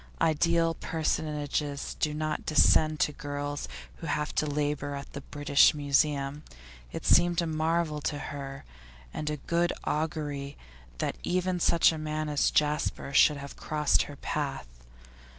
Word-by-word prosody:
Ideal 165 Hz, +1 st, +2 dB
personages 150 Hz, -3 st, -2 dB
do 155 Hz, -, +1 dB
not 155 Hz, 0 st, -2 dB
descend 155 Hz, 0 st, +4 dB
to -, -, +3 dB
girls 145 Hz, 0 st, -4 dB, 0.3 s
who 165 Hz, -, -7 dB
have 150 Hz, 0 st, -1 dB
to 155 Hz, -, 0 dB
labour 145 Hz, -1 st, -1 dB
at 140 Hz, 0 st, -8 dB
the 140 Hz, -, -6 dB
British 145 Hz, +1 st, +3 dB
Museum; 145 Hz, 0 st, +1 dB, 0.5 s
it -, -, -6 dB
seemed 175 Hz, -1 st, +4 dB
a 170 Hz, -, +1 dB
marvel 160 Hz, -1 st, 0 dB
to 145 Hz, -, -2 dB
her, 140 Hz, -2 st, -7 dB, 0.5 s
and 150 Hz, -, -3 dB
of 150 Hz, -2 st, -5 dB
good 170 Hz, +1 st, +1 dB
augury, 150 Hz, -3 st, -3 dB, 0.4 s
that -, -, -2 dB
even 180 Hz, 0 st, 0 dB
such 170 Hz, 0 st, +4 dB
a 160 Hz, -, -5 dB
man 155 Hz, 0 st, -3 dB
as 145 Hz, -1 st, +2 dB
Jasper 150 Hz, -2 st, 0 dB
should 150 Hz, +1 st, +6 dB
have 140 Hz, 0 st, -8 dB
crossed 150 Hz, -1 st, +1 dB
her 145 Hz, -, -8 dB
path. 140 Hz, -, -3 dB
150 Hz, 145 wpm, -29 LUFS, 145-160 Hz, 0.5 s, should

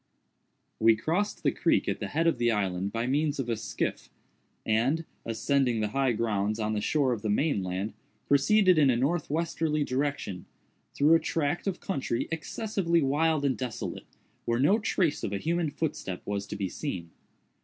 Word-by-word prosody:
We 115 Hz, 0 st, +6 dB
crossed 175 Hz, -, -1 dB
the -, -, +3 dB
creek -, -, +1 dB
at -, -, -1 dB
the -, -, -3 dB
head 160 Hz, +3 st, 0 dB
of 165 Hz, -7 st, +2 dB
the 120 Hz, 0 st, +3 dB
island 100 Hz, -3 st, -1 dB
by 115 Hz, +1 st, -1 dB
means 145 Hz, +3 st, +1 dB
of 130 Hz, -3 st, -3 dB
a 115 Hz, -, +1 dB
skiff, 110 Hz, 0 st, -3 dB, 0.6 s
and, 130 Hz, +9 st, +1 dB, 0.2 s
ascending 125 Hz, +1 st, +1 dB
the 105 Hz, -1 st, 0 dB
high 135 Hz, +1 st, +1 dB
grounds 105 Hz, -1 st, -1 dB
on 110 Hz, 0 st, -1 dB
the 105 Hz, -, -1 dB
shore 135 Hz, +1 st, +2 dB
of 110 Hz, -, -4 dB
the 110 Hz, -, -2 dB
main 140 Hz, +1 st, +1 dB
land, 95 Hz, +3 st, -3 dB, 0.3 s
proceeded 185 Hz, +5 st, +4 dB
in 140 Hz, -3 st, +5 dB
a 120 Hz, -, +3 dB
northwesterly 155 Hz, +1 st, 0 dB
direction, 130 Hz, -9 st, -2 dB, 0.5 s
through 150 Hz, +3 st, +5 dB
a 165 Hz, -, +6 dB
tract 160 Hz, +2 st, -1 dB
of 190 Hz, -2 st, -1 dB
country 135 Hz, -, -2 dB
excessively 170 Hz, 0 st, 0 dB
wild 150 Hz, +2 st, +2 dB
and 130 Hz, -5 st, 0 dB
desolate, 125 Hz, -4 st, -5 dB, 0.4 s
where 115 Hz, 0 st, +1 dB
no 190 Hz, -, +4 dB
trace 180 Hz, -7 st, 0 dB
of 100 Hz, -, -2 dB
a -, -, 0 dB
human 165 Hz, -, 0 dB
footstep 140 Hz, -, -4 dB
was 100 Hz, 0 st, -3 dB
to -, -, -5 dB
be 100 Hz, -2 st, -2 dB
seen. 90 Hz, -, -5 dB
135 Hz, 175 wpm, -28 LUFS, 110-160 Hz, 0.6 s, We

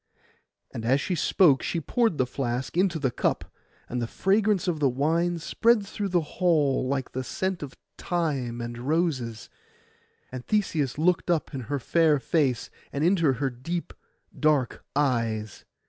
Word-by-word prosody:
And 115 Hz, -, -6 dB
as 130 Hz, +4 st, +3 dB
she 180 Hz, -, -2 dB
spoke, 155 Hz, -4 st, +4 dB
she 170 Hz, -, -2 dB
poured 225 Hz, -, +1 dB
the 130 Hz, -, +2 dB
flask 125 Hz, +1 st, -3 dB
into 180 Hz, -2 st, +2 dB
the 135 Hz, -5 st, 0 dB
cup; -, -, -1 dB, 0.4 s
and 125 Hz, 0 st, -3 dB
the 115 Hz, -, -2 dB
fragrance 200 Hz, -, +1 dB
of 165 Hz, -4 st, 0 dB
the 140 Hz, -2 st, +3 dB
wine 165 Hz, +7 st, +1 dB
spread 220 Hz, +6 st, +2 dB
through 200 Hz, 0 st, -4 dB
the 175 Hz, -2 st, +2 dB, 0.2 s
hall, 150 Hz, -7 st, +3 dB
like 135 Hz, -1 st, -2 dB
the 130 Hz, -, -3 dB
scent 190 Hz, +6 st, -2 dB
of 140 Hz, -3 st, -7 dB, 0.2 s
thyme 140 Hz, -9 st, -2 dB
and 120 Hz, 0 st, -6 dB
roses. 130 Hz, -6 st, -1 dB, 0.8 s
And 130 Hz, -1 st, -6 dB
Theseus 160 Hz, -10 st, 0 dB
looked 170 Hz, +3 st, +1 dB
up 165 Hz, -3 st, 0 dB
in 135 Hz, -, -4 dB
her 145 Hz, -, 0 dB
fair 155 Hz, +3 st, +3 dB
face 135 Hz, -4 st, 0 dB, 0.2 s
and 145 Hz, -, -2 dB
into 170 Hz, -5 st, +3 dB
her 135 Hz, +2 st, -1 dB
deep 165 Hz, +8 st, -5 dB, 0.5 s
dark 150 Hz, -5 st, +1 dB
eyes. 115 Hz, -7 st, -1 dB
150 Hz, 160 wpm, -26 LUFS, 130-175 Hz, 0.8 s, spoke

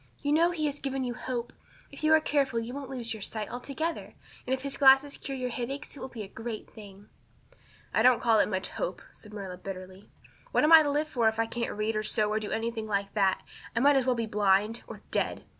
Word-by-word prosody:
You 290 Hz, -, -2 dB
know 330 Hz, +3 st, +5 dB
he 325 Hz, -3 st, -2 dB
has 290 Hz, -1 st, -2 dB
given 270 Hz, -1 st, -2 dB
you 245 Hz, -1 st, -2 dB
hope. 245 Hz, -1 st, -4 dB, 0.4 s
If 280 Hz, -, -10 dB
you 310 Hz, -, +4 dB
are -, -, +6 dB
careful 280 Hz, -5 st, 0 dB
you 230 Hz, +2 st, -5 dB
won't 275 Hz, -1 st, -6 dB
lose 240 Hz, -4 st, -4 dB
your 220 Hz, -, -8 dB
sight 215 Hz, +2 st, -4 dB
altogether; 280 Hz, +7 st, -4 dB, 0.3 s
and -, -, -3 dB
if 260 Hz, -, -10 dB
his 280 Hz, -1 st, -3 dB
glasses 270 Hz, +1 st, +6 dB
cure 270 Hz, -1 st, -5 dB
your 250 Hz, -1 st, -2 dB
headaches 270 Hz, +6 st, -5 dB
it -, -, -10 dB
will -, -, -5 dB
be 235 Hz, -4 st, -7 dB
a -, -, -8 dB
great 225 Hz, +2 st, -6 dB
thing." 205 Hz, -2 st, -13 dB, 0.9 s
"I -, -, +3 dB
don't 250 Hz, -1 st, +6 dB
call 225 Hz, -2 st, +4 dB
it -, -, +3 dB
much 190 Hz, -2 st, -2 dB
hope," -, -, -4 dB
said 210 Hz, -, -14 dB
Marilla 195 Hz, -3 st, -6 dB
bitterly. 185 Hz, +1 st, -9 dB, 0.4 s
"What -, -, +3 dB
am 305 Hz, -, +4 dB
I 320 Hz, -, +11 dB
to 295 Hz, -, +1 dB
live 295 Hz, +2 st, 0 dB
for 235 Hz, -5 st, +3 dB
if 220 Hz, -, -6 dB
I 225 Hz, -, +2 dB
can't 235 Hz, +1 st, -3 dB
read 215 Hz, +1 st, -1 dB
or 215 Hz, -, +1 dB
sew 215 Hz, 0 st, 0 dB
or 215 Hz, -, +1 dB
do 215 Hz, -, -5 dB
anything 225 Hz, -1 st, -2 dB
like 200 Hz, -1 st, -1 dB
that? 195 Hz, -3 st, +2 dB, 0.3 s
I -, -, +2 dB
might 285 Hz, +3 st, +5 dB
as 265 Hz, -1 st, +2 dB
well 255 Hz, -, +3 dB
be 230 Hz, -1 st, -1 dB
blind 210 Hz, +1 st, +2 dB
or -, -, -10 dB
dead. -, -, -1 dB
235 Hz, 245 wpm, -29 LUFS, 215-275 Hz, 0.9 s, I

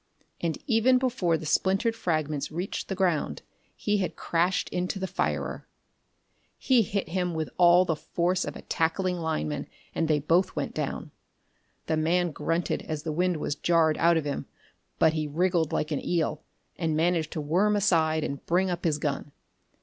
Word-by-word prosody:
And 165 Hz, -2 st, -1 dB
even 245 Hz, +2 st, +4 dB
before 240 Hz, -10 st, +1 dB
the 160 Hz, -, -8 dB
splintered 195 Hz, +8 st, +1 dB
fragments 155 Hz, -6 st, -1 dB
reached 175 Hz, +5 st, -4 dB
the 195 Hz, -, -3 dB
ground 180 Hz, -5 st, 0 dB, 0.3 s
he 210 Hz, 0 st, 0 dB
had 185 Hz, -3 st, -2 dB
crashed 175 Hz, +2 st, 0 dB
into 180 Hz, +2 st, -2 dB
the 190 Hz, -, -2 dB
firer. 190 Hz, 0 st, -2 dB, 0.9 s
He 255 Hz, -3 st, +3 dB
hit 195 Hz, -4 st, -2 dB
him 180 Hz, -1 st, -1 dB
with 160 Hz, -1 st, -3 dB
all 175 Hz, +1 st, +7 dB
the 165 Hz, -, 0 dB
force 180 Hz, +4 st, -1 dB
of -, -, -5 dB
a -, -, -9 dB
tackling 180 Hz, +3 st, 0 dB
lineman, 75 Hz, -, -2 dB, 0.3 s
and 165 Hz, -, 0 dB
they 155 Hz, -1 st, +3 dB
both 170 Hz, +6 st, +2 dB
went -, -, -3 dB
down. -, -, -4 dB, 0.7 s
The 160 Hz, -, 0 dB
man 170 Hz, +2 st, +1 dB
grunted 165 Hz, +3 st, -1 dB
as 155 Hz, -1 st, -3 dB
the 160 Hz, -, -2 dB
wind 180 Hz, +2 st, +1 dB
was 145 Hz, -, -2 dB
jarred 160 Hz, +1 st, +2 dB
out 170 Hz, 0 st, +4 dB
of 160 Hz, -, -1 dB
him, 145 Hz, -1 st, -3 dB, 0.5 s
but 160 Hz, -1 st, +4 dB
he 155 Hz, -1 st, -1 dB
wriggled 170 Hz, +1 st, +1 dB
like 150 Hz, -, -1 dB
an 145 Hz, -, -2 dB
eel 160 Hz, -3 st, 0 dB, 0.4 s
and 160 Hz, -3 st, 0 dB
managed 165 Hz, -1 st, +1 dB
to -, -, -3 dB
worm 185 Hz, +8 st, +2 dB
aside 160 Hz, -6 st, +2 dB
and 140 Hz, -2 st, -4 dB
bring 185 Hz, +2 st, +2 dB
up 175 Hz, 0 st, -4 dB
his 155 Hz, -3 st, +2 dB
gun. 145 Hz, -1 st, -3 dB
170 Hz, 175 wpm, -27 LUFS, 155-185 Hz, 0.9 s, all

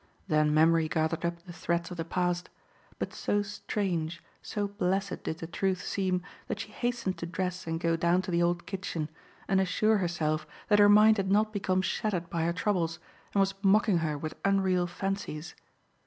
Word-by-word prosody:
Then 155 Hz, -3 st, +3 dB
memory 160 Hz, +1 st, +4 dB
gathered 160 Hz, +1 st, 0 dB
up 170 Hz, 0 st, -3 dB
the 175 Hz, -, -9 dB
threads 170 Hz, +1 st, -2 dB
of 175 Hz, -, -6 dB
the 165 Hz, -, -1 dB
past; 175 Hz, +1 st, -1 dB, 0.5 s
but -, -, -4 dB
so 205 Hz, 0 st, 0 dB
strange, 175 Hz, -5 st, -3 dB, 0.2 s
so 205 Hz, -1 st, -2 dB
blessed 195 Hz, -1 st, -1 dB
did 160 Hz, -, -3 dB
the 165 Hz, -, -6 dB
truth 185 Hz, +2 st, -1 dB
seem 185 Hz, -2 st, -1 dB, 0.2 s
that -, -, -3 dB
she -, -, -6 dB
hastened 240 Hz, -6 st, -2 dB
to 170 Hz, -, -4 dB
dress 180 Hz, 0 st, -3 dB
and 165 Hz, 0 st, -1 dB
go 165 Hz, -1 st, +1 dB
down 170 Hz, +2 st, +2 dB
to 185 Hz, -, -4 dB
the 170 Hz, 0 st, +2 dB
old 175 Hz, 0 st, +1 dB
kitchen 180 Hz, -6 st, -4 dB, 0.4 s
and 190 Hz, -1 st, +3 dB
assure 215 Hz, +3 st, +2 dB
herself 155 Hz, -4 st, -1 dB, 0.2 s
that 205 Hz, -1 st, +5 dB
her 205 Hz, 0 st, +7 dB
mind 215 Hz, +1 st, +7 dB
had 190 Hz, -1 st, 0 dB
not 215 Hz, +2 st, +3 dB
become 185 Hz, -2 st, +1 dB
shattered 180 Hz, -4 st, -1 dB
by 165 Hz, -1 st, 0 dB
her 170 Hz, -, +2 dB
troubles 170 Hz, -4 st, 0 dB, 0.4 s
and 200 Hz, -, +5 dB
was 195 Hz, 0 st, +2 dB
mocking 200 Hz, -1 st, +4 dB
her 155 Hz, -2 st, -1 dB
with 155 Hz, +2 st, -5 dB
unreal 190 Hz, -2 st, +2 dB
fancies. 175 Hz, -3 st, -4 dB
180 Hz, 185 wpm, -29 LUFS, 165-195 Hz, 0.5 s, her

